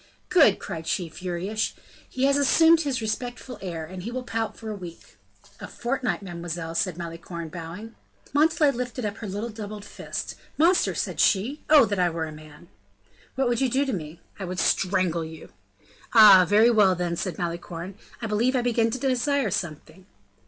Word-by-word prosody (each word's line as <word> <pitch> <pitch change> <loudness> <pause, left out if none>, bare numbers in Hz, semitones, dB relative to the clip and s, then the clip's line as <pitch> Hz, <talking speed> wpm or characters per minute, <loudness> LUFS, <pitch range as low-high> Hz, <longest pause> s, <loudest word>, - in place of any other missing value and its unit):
"Good!" 285 - +5
cried 165 -1 -7
she, 175 -3 -1
furious; 185 +6 -3 0.4
"he 255 - -3
has 280 0 +4
assumed 320 +4 +5
his 275 -6 -1
respectful 245 +1 -4
air 170 -4 -5
and 185 +3 -8
he 210 - -5
will 255 +1 -4
pout 225 -2 -3
for 220 -1 -6
a - - -4
week." 175 -4 -11 0.4
"A - - -7
fortnight, 245 -3 -2
mademoiselle," 170 -2 -5
said 175 0 -1
Malicorne, 170 -1 -7
bowing. 175 +7 -8 0.4
Montalais 310 0 +4
lifted 250 -1 -4
up 205 0 -3
her 220 - -6
little 205 +4 -4
doubled 210 -1 -7
fist. - - -6 0.2
"Monster!" 345 +4 +3
said - - -3
she; 230 +10 +2
"oh! 295 -5 +8
that 200 -3 -2
I 180 -1 +3
were 165 -1 -3
a 155 - -7
man!" 155 +2 -14 0.7
"What 265 -1 +1
would 240 +1 0
you 265 - +2
do 270 +4 +1
to 270 - -2
me?" 160 -2 -6 0.2
"I - - -4
would 185 0 -5
strangle 185 -3 +1
you." 160 0 -10 0.7
"Ah! 200 -5 +9
very 220 +3 +6
well, 205 -5 +4
then," 175 -1 -2
said 175 -1 -4
Malicorne; 170 +1 -5 0.3
"I - - 0
believe 225 +5 +1
I 250 - +1
begin 230 -2 +2
to 230 - -3
desire 265 -2 0
something." 170 0 -5
205 Hz, 180 wpm, -25 LUFS, 175-245 Hz, 0.7 s, Ah